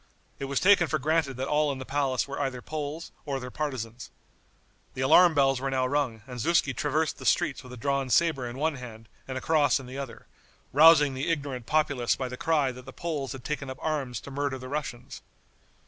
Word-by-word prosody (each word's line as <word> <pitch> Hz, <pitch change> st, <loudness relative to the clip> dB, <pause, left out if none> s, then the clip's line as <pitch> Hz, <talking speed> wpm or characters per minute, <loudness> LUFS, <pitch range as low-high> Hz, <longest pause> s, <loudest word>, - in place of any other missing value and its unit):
It 140 Hz, -, -3 dB
was 135 Hz, 0 st, 0 dB
taken 185 Hz, -3 st, +5 dB
for 155 Hz, -, 0 dB
granted 155 Hz, -1 st, 0 dB
that 130 Hz, +1 st, -2 dB
all 150 Hz, 0 st, +2 dB
in 135 Hz, -, -4 dB
the 130 Hz, -, -7 dB
palace 135 Hz, -2 st, 0 dB
were 140 Hz, +1 st, -4 dB
either 135 Hz, -3 st, -2 dB
Poles 155 Hz, +3 st, -5 dB
or 140 Hz, -2 st, -3 dB
their 125 Hz, -1 st, -7 dB
partisans. 125 Hz, -6 st, -4 dB, 0.9 s
The 130 Hz, -, -3 dB
alarm 170 Hz, +5 st, +6 dB
bells 135 Hz, -2 st, +3 dB
were 135 Hz, -, -1 dB
now 130 Hz, -1 st, +1 dB
rung, 130 Hz, -5 st, -1 dB
and 125 Hz, -2 st, -8 dB
Zuski 140 Hz, 0 st, +2 dB
traversed 150 Hz, +5 st, -1 dB
the -, -, -9 dB
streets 155 Hz, -6 st, +2 dB
with 125 Hz, -, -12 dB
a 125 Hz, -, -8 dB
drawn 140 Hz, +1 st, -1 dB
saber 135 Hz, -4 st, +2 dB
in 120 Hz, -, -8 dB
one 155 Hz, 0 st, 0 dB
hand 115 Hz, -3 st, -10 dB, 0.2 s
and 130 Hz, -1 st, -4 dB
a -, -, -4 dB
cross 145 Hz, -5 st, +3 dB
in 135 Hz, -, -9 dB
the 130 Hz, +2 st, -7 dB
other, 135 Hz, -4 st, -7 dB, 0.5 s
rousing 150 Hz, -1 st, +7 dB
the 130 Hz, +5 st, -2 dB
ignorant 140 Hz, -7 st, -3 dB
populace 145 Hz, -6 st, +1 dB
by 130 Hz, -1 st, -4 dB
the 125 Hz, -, -6 dB
cry 145 Hz, -1 st, +1 dB
that 125 Hz, 0 st, -11 dB
the 135 Hz, -, -9 dB
Poles 150 Hz, -5 st, -3 dB
had 135 Hz, -2 st, -9 dB
taken 145 Hz, -2 st, -4 dB
up 130 Hz, -, -6 dB
arms 145 Hz, -6 st, -2 dB
to 140 Hz, -, -10 dB
murder 140 Hz, -1 st, -2 dB
the 130 Hz, 0 st, -9 dB
Russians. 135 Hz, -4 st, -5 dB
135 Hz, 220 wpm, -27 LUFS, 130-150 Hz, 0.9 s, rousing